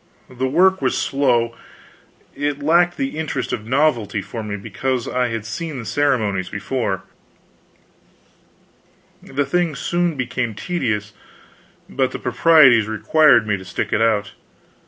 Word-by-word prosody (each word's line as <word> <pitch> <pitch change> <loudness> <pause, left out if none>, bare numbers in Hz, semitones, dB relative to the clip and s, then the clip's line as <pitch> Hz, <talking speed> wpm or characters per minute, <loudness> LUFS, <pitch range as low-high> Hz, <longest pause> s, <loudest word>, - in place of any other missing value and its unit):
The 130 +1 -2
work 185 +7 +3
was - - 0
slow; 120 -4 +1 0.8
it 145 -1 -2
lacked 175 +3 +3
the 270 - -3
interest 160 -3 -3
of 110 -2 -5
novelty 130 -6 +1
for 115 +4 -6
me, 105 -1 -5
because 125 +5 -3
I 125 -1 0
had 115 -2 -4
seen 155 +6 -5
the 120 - -7
ceremonies 110 -12 0
before; 105 -1 -3 2.2
the 140 +1 -2
thing 170 +1 0
soon 175 +3 -1
became 125 -3 -3
tedious, 105 - -3 0.7
but 65 - 0
the - - -3
proprieties 135 -10 +5
required 120 +2 +4
me 105 -1 0
to 95 - -10
stick 90 -1 -4
it - - +1
out. 105 -3 +1
125 Hz, 135 wpm, -20 LUFS, 110-155 Hz, 2.2 s, proprieties